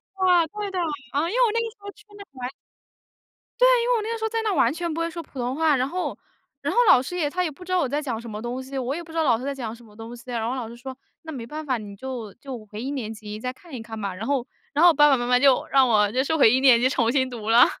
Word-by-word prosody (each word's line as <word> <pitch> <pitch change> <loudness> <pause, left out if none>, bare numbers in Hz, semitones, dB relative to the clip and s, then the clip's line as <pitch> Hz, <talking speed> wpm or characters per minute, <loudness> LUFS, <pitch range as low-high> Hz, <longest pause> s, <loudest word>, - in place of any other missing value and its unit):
对 385 -1 -3
的， 350 -2 +5
对 410 -1 -3
的。 375 - -3 0.4
嗯， 285 - +2
因 435 - -4
为 - - +5
我 450 - +2
那 460 - +1
个 460 - -2
时 470 - -23
候 405 0 -8
去 420 - -20
的 400 - -10
完 255 -2 -5 1.1
对， - - +7 0.2
因 485 - -1
为 - - +4
我 450 - 0
那 435 +2 -4
个 460 - -2
时 445 - -7
候 445 - +1
在 455 0 -1
那 430 -3 0
完 270 -4 +3
全 340 0 -3
不 325 - -4
会 335 0 -1
说 335 0 -6
普 270 - -11
通 245 +2 -2
话， 315 -1 +3
然 255 +1 0
后 360 +4 -3 0.4
然 - - -1
后 - - -4
老 250 - +7
师 270 +7 -6
也 315 -5 0
他 360 +4 -1
也 345 - -1
不 310 +5 -12
知 365 - -8
道 370 - +3
我 290 - +1
在 290 +3 -1
讲 250 -7 -3
什 235 0 -9
么 210 0 -6
东 240 +2 -4
西， 270 +1 -7
我 260 +1 -2
也 345 - -5
不 325 - -13
知 330 - -6
道 320 - +3
老 240 -6 +3
师 250 - -8
在 280 - -2
讲 230 -4 -5
什 240 - -17
么 210 -2 -18
东 225 +2 -9
西， 235 - -13
然 230 -2 -2
后 250 - -2
老 245 -4 -4
师 235 - -10
说， 260 +2 -8 0.3
那 320 - -7
没 245 -5 -6
办 305 +4 -6
法， 260 -4 0
你 205 -2 -9
就 240 -3 -6
就 245 -4 -8
回 210 +1 -8
一 270 - -3
年 235 -6 -4
级 210 -1 -8
再 250 +3 -3
看 320 +3 -17
一 240 - -5
看 225 -1 -8
吧， 200 -2 -3
然 190 +5 -6
后 270 -3 0 0.3
然 300 - +3
后 350 - +9
我 - - +4
爸 295 0 +6
爸 275 - +5
妈 240 - -2
妈 250 0 +3
就 270 -1 +4
让 270 -2 +4
我 210 -3 +3
就 255 +3 +1
收 320 +3 0
回 225 - +6
一 255 - +3
年 260 -3 +6
级 255 - +4
重 240 -4 +1
新 260 -1 +1
读 225 -3 -6
了。 235 +2 +8
265 Hz, 365 characters per minute, -24 LUFS, 235-330 Hz, 1.1 s, 后